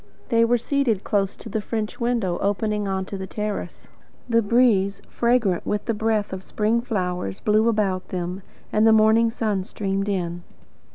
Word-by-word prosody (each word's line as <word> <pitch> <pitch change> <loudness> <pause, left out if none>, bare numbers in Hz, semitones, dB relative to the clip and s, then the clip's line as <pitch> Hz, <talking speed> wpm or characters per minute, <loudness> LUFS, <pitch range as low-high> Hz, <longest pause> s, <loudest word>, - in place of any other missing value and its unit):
They 230 -1 +4
were 240 +1 +3
seated 240 -4 0
close 195 -2 0
to - - -11
the 220 0 -2
French 215 0 -4
window 235 -7 0
opening 210 +1 0
on 190 -1 -1
to 195 0 -6
the 190 - -5
terrace; 210 0 -5 0.4
the 230 -1 +3
breeze, 205 -3 +3
fragrant 235 -7 +1
with 210 - -2
the 230 - 0
breath 215 -2 0
of 190 - -5
spring 215 +4 0
flowers, 180 - -3
blew 215 +2 +3
about 200 -4 0
them, 180 +1 -4 0.3
and 215 +1 +4
the 220 - +7
morning 220 +1 +5
sun 215 -4 -1
streamed 195 +1 -2
in. 175 -3 -2
210 Hz, 170 wpm, -23 LUFS, 190-230 Hz, 0.4 s, the